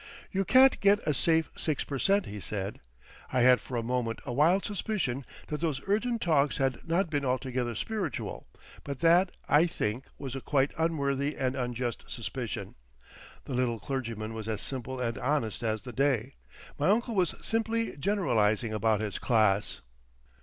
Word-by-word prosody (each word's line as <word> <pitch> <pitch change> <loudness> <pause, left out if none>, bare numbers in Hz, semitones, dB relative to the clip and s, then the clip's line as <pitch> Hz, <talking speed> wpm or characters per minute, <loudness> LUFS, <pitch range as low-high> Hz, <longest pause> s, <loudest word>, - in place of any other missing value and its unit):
"You 195 0 0
can't 260 +7 +6
get 200 +1 +5
a 150 - +2
safe 160 +3 +2
six 155 -3 -1
per 140 -2 -4
cent.," 200 +5 +3
he 105 +1 -7
said. 100 0 -4 0.5
I 130 - +2
had 125 0 +6
for 125 - -5
a 115 - -1
moment 115 -1 -1
a 120 - -3
wild 165 +9 +3
suspicion 185 - -2 0.2
that 150 0 -3
those 155 -5 0
urgent 230 +3 0
talks 150 -4 +2
had 135 0 -1
not 170 +1 +1
been 145 -2 0
altogether 125 -2 -1
spiritual, 200 - -3 0.4
but 140 -2 -6
that, 175 +3 +5 0.2
I 155 +4 +5
think, 120 -5 -2
was 135 -2 -6
a 135 - -4
quite 140 0 +1
unworthy 145 -3 0
and 130 0 0
unjust 125 -2 -3
suspicion. - - -5 0.7
The 135 - -5
little 125 -2 0
clergyman 115 -2 -4
was 110 -1 -6
as 110 -2 -2
simple 130 -1 -3
and 115 -2 -2
honest 125 -5 -1
as 110 -2 -1
the 125 -1 -8
day. 135 -1 +1 0.5
My 150 - +2
uncle 235 +3 +2
was 185 -4 +2
simply 225 0 0
generalising 120 - +1
about 110 0 +1
his 105 -2 -3
class. 110 -4 +2
135 Hz, 165 wpm, -29 LUFS, 120-170 Hz, 0.7 s, can't